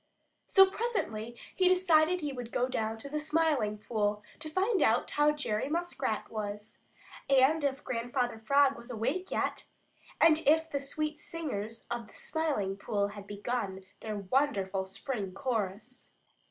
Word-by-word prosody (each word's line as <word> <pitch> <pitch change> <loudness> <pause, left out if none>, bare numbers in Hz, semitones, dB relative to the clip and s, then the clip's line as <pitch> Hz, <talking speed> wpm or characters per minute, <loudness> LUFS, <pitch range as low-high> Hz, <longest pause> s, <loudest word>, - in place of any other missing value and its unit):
So 385 -1 +8
presently 240 - -3 0.2
he 370 -1 +4
decided 360 -1 +4
that - - -3
he 285 - -2
would 245 -2 -6
go 250 - +1
down 225 -3 -2
to 225 - -8
the 300 +2 -2
Smiling 300 -9 +1
Pool 210 -1 -1 0.2
to 310 0 -6
find 385 +6 +1
out - - +3
how 295 +1 +4
Jerry 275 -5 -2
Muskrat 280 -9 -2
was, 210 0 -5 0.5
and 275 +3 +5
if 275 -1 -1
Grandfather 245 -1 -2
Frog 275 +4 +4
was 235 +1 -7
awake 260 - -2
yet, - - -1 0.5
and 320 -1 +6
if 320 +2 +4
the 280 - 0
sweet 305 +2 -3
singers 230 -10 -5
of 235 -2 -3
the - - -18
Smiling 285 -12 -1
Pool 205 -1 -1
had 205 -1 -10
begun 205 -2 -3
their 215 -1 -4
wonderful 195 -3 0
spring 195 0 -4
chorus. 225 0 -3
255 Hz, 155 wpm, -31 LUFS, 210-305 Hz, 0.5 s, So